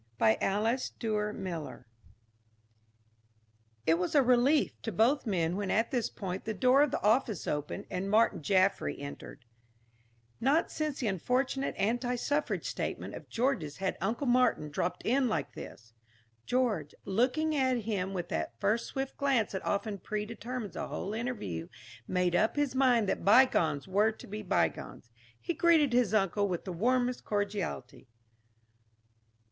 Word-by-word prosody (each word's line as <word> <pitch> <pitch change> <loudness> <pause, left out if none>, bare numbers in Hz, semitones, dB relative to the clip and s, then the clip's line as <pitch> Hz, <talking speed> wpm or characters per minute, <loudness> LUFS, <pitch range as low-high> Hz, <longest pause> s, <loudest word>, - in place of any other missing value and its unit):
BY 110 -1 +3
ALICE 220 +6 0
DUER 210 -2 -1
MILLER 180 -7 -6 2.0
It 165 +1 +3
was 180 +10 -2
a 285 - +6
relief 255 +4 +3
to 225 - -3
both 240 - +2
men 175 -4 0
when 200 -1 -2
at 225 +4 +1
this 245 -4 0
point 190 -1 -5
the 220 - -3
door 255 +7 +4
of 295 - +4
the - - -3
office 215 - +2
opened 150 +7 -3
and 185 +2 -2
Martin 220 -2 +3
Jaffry 190 +4 +2
entered. 140 -3 -9 0.9
Not 280 +7 +2
since 305 -3 -3
the 240 - 0
unfortunate 255 +8 -1
anti 245 +5 0
suffrage 290 +5 -1
statement - - -4
of - - -10
George's 230 - -1
had 190 -1 -1
Uncle 225 +8 -1
Martin 245 - +2
dropped 170 +4 -2
in 260 +3 +2
like 215 - -2
this. 115 0 -11 0.5
George, 225 - 0
looking 260 +10 +1
at 260 -3 +1
him 200 -3 -2
with 175 -1 -3
that 95 +10 -3
first 220 +3 +1
swift 270 -1 -4
glance 270 -6 +1
that 190 - -4
often 200 0 -2
predetermines 220 +3 -5
a - - -3
whole 200 - -4
interview, 215 - -4 0.4
made 180 -1 +1
up 220 +4 +2
his 290 -3 0
mind 250 -5 +3
that - - -1
bygones 195 - +4
were 205 +4 +3
to 220 - -12
be 210 +2 -6
bygones. 180 - -2 0.3
He 345 - -3
greeted 325 -7 +4
his 245 -4 +3
uncle 205 -1 +2
with 180 -3 -3
the 185 - -4
warmest 245 +6 +1
cordiality. 200 -11 -3
215 Hz, 150 wpm, -30 LUFS, 185-250 Hz, 2.0 s, a